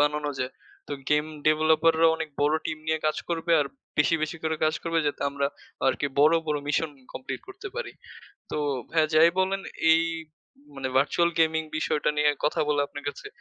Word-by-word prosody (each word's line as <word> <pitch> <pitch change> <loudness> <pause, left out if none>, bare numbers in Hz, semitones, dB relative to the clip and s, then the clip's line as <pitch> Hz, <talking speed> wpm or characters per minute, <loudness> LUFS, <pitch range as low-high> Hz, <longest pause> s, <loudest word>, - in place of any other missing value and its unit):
বানানো 150 0 +1
যায়। 125 0 -2 0.4
তো - - -4 0.2
গেম 150 0 +3 0.2
ডেভেলপার 155 +1 +4
রা 165 - +7
অনেক 160 - -4
বড় 145 +2 +3
টিম 155 - -3
নিয়ে 160 0 +1
কাজ 155 - +1
করবে। 170 0 0
আর 145 - 0 0.3
বেশি, 150 +3 +4
বেশি 155 +2 -2
করে 160 0 0
কাজ 155 +1 +2
করবে 165 0 0
যাতে 145 - -2
আমরা 140 0 0 0.4
আরকি 135 - +1
বড়, 150 +3 +6
বড় 150 -1 0
মিশন 150 +2 +1 0.2
কমপ্লিট 130 - -5
করতে 390 +1 -8
পারি। 485 - -4 0.6
তো - - -2 0.3
ভাইয়া 160 -1 +2
যাই 160 +2 +7
বলেন 195 +1 +1 0.3
এই 165 0 +3 0.7
মানে 135 -1 -3
ভার্চুয়াল 170 +5 +3
গেমিং 160 0 +3
বিষয়টা 150 -1 0
নিয়ে 150 0 +4 0.2
কথা 150 - 0
বলে 145 -1 +2
আপনার 145 - -9
কাছে, 415 - -10
155 Hz, 185 wpm, -26 LUFS, 150-165 Hz, 0.7 s, রা